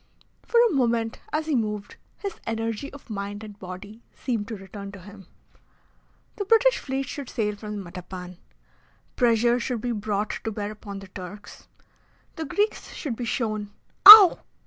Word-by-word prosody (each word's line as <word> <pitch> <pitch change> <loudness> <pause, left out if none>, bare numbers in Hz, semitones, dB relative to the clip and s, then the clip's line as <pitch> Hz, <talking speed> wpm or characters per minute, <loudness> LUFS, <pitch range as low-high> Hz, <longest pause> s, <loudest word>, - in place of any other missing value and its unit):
For 470 - +1
a 460 - +1
moment 235 -4 0
as 310 +1 -1
he 315 - -2
moved, 210 -4 -3 0.2
his 400 -1 -6
energy 225 +3 -3
of 285 - -14
mind 205 +1 -5
and 210 -2 -11
body 195 +4 -10
seemed 230 -6 -3
to 225 - -5
return 195 +1 -9
to 200 - -10
him. 195 -1 -14 1.1
The 405 - -3
British - - +4
fleet 270 0 -3
should 280 -2 -7
sail 210 -3 -2
from 210 -1 -7
Matapan. 180 0 -9 0.8
Pressure 240 0 +3
should 240 -1 -3
be 245 - -2
brought 210 -1 -2
to 220 - -3
bear 205 0 -4
upon 205 -2 -9
the 195 - -11
Turks. 185 +2 -11 0.7
The 320 - -5
Greeks 415 +8 -2
should 275 -7 -4
be 240 - -5
shown 215 -4 -3 0.3
Ow! 415 -3 +12
220 Hz, 160 wpm, -25 LUFS, 205-255 Hz, 1.1 s, Ow